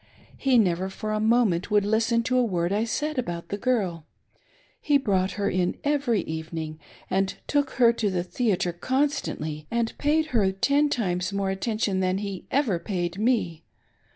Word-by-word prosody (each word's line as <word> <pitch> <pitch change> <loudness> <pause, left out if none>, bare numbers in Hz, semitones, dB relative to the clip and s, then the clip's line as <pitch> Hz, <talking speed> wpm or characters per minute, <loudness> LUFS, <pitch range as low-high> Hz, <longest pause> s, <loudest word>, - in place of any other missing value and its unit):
He 265 -2 +2
never 185 -3 +2
for 215 +2 -5
a 215 - 0
moment 220 -5 +2
would 205 -1 +3
listen 225 +2 +2
to 255 - 0
a - - +4
word 180 -4 0
I 215 +3 +1
said 295 +4 -2
about 175 -7 -4
the - - -2
girl; 190 -11 -1 0.7
he 290 -1 +4
brqught 190 -7 0
her 200 -1 -1
in 180 -1 0
every 280 -7 +1
evening 160 0 -5 0.3
and 190 +1 0
took 285 -2 0
her 235 -2 +5
to 220 -3 0
the 180 -2 -1
theatre 185 -3 0
cdnstantly, 175 - -2
and 235 -1 -1
paid 310 +2 +2
her 200 -5 +3
ten 280 +10 +2
times 180 -8 -1
more 200 -1 -1
atten 215 +3 -2
tion 195 -3 0
than 185 0 +1
he 200 -2 -5
ever 245 -11 +1
paid 180 -1 -3
me. 210 -9 0
205 Hz, 175 wpm, -26 LUFS, 180-245 Hz, 0.7 s, her